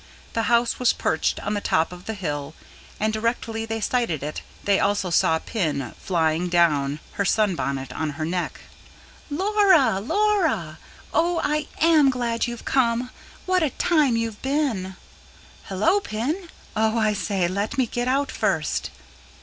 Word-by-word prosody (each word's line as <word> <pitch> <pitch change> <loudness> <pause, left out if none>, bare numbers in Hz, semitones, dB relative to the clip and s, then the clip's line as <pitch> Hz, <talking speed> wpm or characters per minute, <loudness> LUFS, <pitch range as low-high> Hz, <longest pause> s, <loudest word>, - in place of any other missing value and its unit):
The 225 - 0
house 235 0 +2
was 250 -1 +4
perched - - 0
on - - -2
the 205 - -1
top 160 -3 +1
of 180 0 -11
the 220 - -4
hill, 150 -5 -4 0.4
and 215 +1 +1
directly 225 0 -2
they 225 0 -2
sighted 220 - 0
it 150 +1 -4 0.2
they 200 -1 +3
also 200 -3 +1
saw 160 -1 +3
Pin 155 - -2
flying 165 -1 0
down, 150 -5 +2
her 200 - -1
sunbonnet 170 - 0
on 160 -1 -2
her 155 - -2
neck. 180 +2 -3 0.7
"Laura, 375 - +3
Laura! 270 - +1 0.3
Oh, 335 +2 +2
I 300 0 0
AM 315 -4 +6
glad 240 -3 -1
you've 240 -1 -7
come. 245 -1 +1 0.3
What 370 -1 +2
a 310 - +2
time 290 -6 +2
you've 225 -2 -3
been!" 260 -10 -1 0.7
"Hullo, 215 - +2
Pin. 310 - -3 0.3
Oh, 220 +1 +2
I 215 -1 +2
say, 195 -3 0
let 200 +8 -2
me 260 - +3
get 240 +1 -3
out 275 +2 +1
first." - - -1
225 Hz, 150 wpm, -24 LUFS, 180-270 Hz, 0.7 s, AM